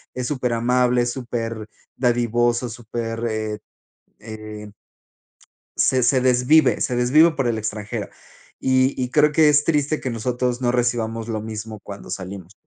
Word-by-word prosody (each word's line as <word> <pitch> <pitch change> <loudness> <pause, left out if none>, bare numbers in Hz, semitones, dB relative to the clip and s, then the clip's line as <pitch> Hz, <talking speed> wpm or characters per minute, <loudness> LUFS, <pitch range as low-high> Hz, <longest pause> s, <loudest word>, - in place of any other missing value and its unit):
es 125 -1 -3
súper 125 -4 -1
amable, 125 +1 +2
es 120 - -1
super 115 -3 -4 0.3
dadivoso, 120 0 +1
súper, 115 0 -5
eh 110 -1 -3 0.6
eh" 110 -1 -9 1.1
"se 130 -1 +3
se 125 +1 +3
desvive 130 +5 +4
se 125 - 0
desvive 150 +7 +5
por 135 -5 -1
el 115 -2 0
extranjero". 105 -1 -4 0.5
Y 130 +1 +2
y 125 0 -2
creo 150 0 +4
que 155 0 +4
es 150 0 +4
triste 150 -1 +1
que 130 - -3
nosotros 125 +2 -2
no 120 -1 +2
recibamos 115 -2 -1
lo 110 -2 -2
mismo 110 0 -7
cuando 100 0 -10
salimos 95 0 -7
120 Hz, 145 wpm, -22 LUFS, 110-130 Hz, 1.1 s, desvive